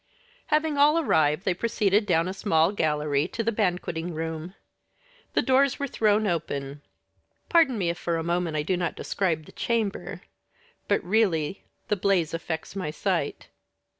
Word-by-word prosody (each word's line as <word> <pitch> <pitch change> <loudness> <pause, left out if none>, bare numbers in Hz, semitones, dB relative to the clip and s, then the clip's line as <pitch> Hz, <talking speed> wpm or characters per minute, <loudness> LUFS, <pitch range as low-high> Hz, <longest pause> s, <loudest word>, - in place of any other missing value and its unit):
Having 305 -1 +1
all 300 +3 +5
arrived, 155 - +2
they 185 - +2
proceeded 205 0 +1
down 170 -2 +2
a 185 - -3
small 165 -4 +2
gallery 150 -5 0
to 230 - -3
the 230 - +1
banqueting 180 -5 -2
room. 160 +3 -5 0.8
The - - +2
doors 270 0 +3
were 280 - -2
thrown 215 -4 +2
open. 145 -6 -3 0.7
Pardon 320 -8 +4
me 175 -4 +1
if 170 - -8
for 170 -1 -1
a 165 - -2
moment 170 -2 -1
I 150 - 0
do 185 +4 0
not 175 -1 -2
describe 165 -6 -1
the - - -14
chamber; 225 -4 -2 0.7
but - - +1
really, 185 -4 +1 0.2
the 210 - +1
blaze 180 -4 +1
affects 165 +1 -4
my 185 -6 -3
sight. 150 - -2
180 Hz, 160 wpm, -26 LUFS, 160-215 Hz, 0.8 s, all